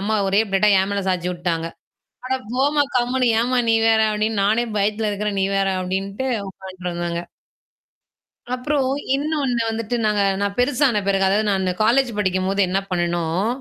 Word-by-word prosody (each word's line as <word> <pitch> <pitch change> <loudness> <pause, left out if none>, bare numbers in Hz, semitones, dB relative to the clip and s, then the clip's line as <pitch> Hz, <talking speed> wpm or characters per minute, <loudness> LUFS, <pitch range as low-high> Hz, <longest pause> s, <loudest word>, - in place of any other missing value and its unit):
அம்மா 215 +2 0
ஒரே 200 +2 +3
பிளேட்டா 200 +2 +3
என் 195 +1 -1
மேல 200 -1 -1
சாய்ந்து 180 -1 -1
விட்டுவிட்டாங்க. 170 -2 -2 0.6
"அட 260 - -1 0.2
போம்மா 285 +3 +2
கம்மென்னு, 245 0 +1
ஏம்மா 250 +1 +1
நீ 225 - +4
வேற, 220 0 +4
அப்படின்னு 210 -1 0
நானே 220 +4 +2
பயத்தில 210 +2 0
இருக்கிறேன், 205 -1 -2
நீ - - +2
வேற" 195 0 +1
அப்படின்னு 200 +6 -2
உட்கார்ந்துருந்தாங்க. 175 -2 -5 1.3
அப்புறம் 265 +1 0 0.3
இன்னொன்னு 280 -4 -1
வந்துட்டு 225 +1 -2
நாங்க 210 -1 +2 0.2
நான் 200 0 -2
பெருசான 250 -3 +2
பிறகு, 195 -1 +2
அதாவது 210 +2 +1
நான் 195 -2 +1
அந்த 185 -1 0
காலேஜ் 245 +3 +3
படிக்கும்பொழுது 190 0 +1
என்ன 190 +2 +1
பண்ணுணோம் 175 +1 -1
205 Hz, 155 wpm, -21 LUFS, 190-240 Hz, 1.3 s, நீ